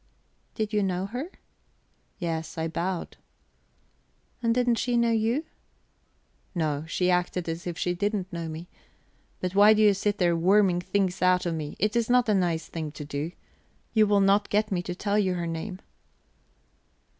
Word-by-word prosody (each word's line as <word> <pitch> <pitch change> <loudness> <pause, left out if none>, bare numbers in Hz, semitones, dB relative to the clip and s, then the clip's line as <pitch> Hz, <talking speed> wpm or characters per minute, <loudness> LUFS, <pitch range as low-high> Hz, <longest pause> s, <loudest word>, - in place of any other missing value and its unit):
"Did 215 0 -2
you 210 - +2
know 185 -1 -1
her?" 250 - -5 0.9
"Yes. 160 -3 -4
I 160 0 -1
bowed." 170 +2 -3 1.2
"And 230 -1 +2
didn't 245 -1 +2
she 245 -1 +1
know 235 0 +3
you?" 230 +7 +1 1.1
"No, 155 -3 -1
she 180 +2 +1
acted 180 -1 0
as 165 +2 -4
if 170 -1 -4
she 180 - 0
didn't 200 0 -2
know 165 -1 -4
me... 160 +2 -7 0.7
But 185 0 -2
why 205 +2 +7
do 215 - +2
you 205 -1 +6
sit 205 +1 -1
there 175 -2 +2
worming 185 +1 +3
things 190 0 -1
out 180 0 +3
of 170 - 0
me? 155 -2 -5
It 210 +3 0
is 235 -1 +1
not 250 -1 +4
a 215 - +3
nice 175 -4 0
thing 160 -2 -5
to 150 - -7
do. 145 +4 -4 0.6
You 215 -2 +5
will 205 -1 +4
not 200 +1 +3
get 210 +1 +1
me 180 -2 0
to 180 0 -5
tell 205 +2 0
you 190 -3 +1
her 175 -1 -2
name." 170 +4 -5
185 Hz, 175 wpm, -27 LUFS, 170-210 Hz, 1.2 s, why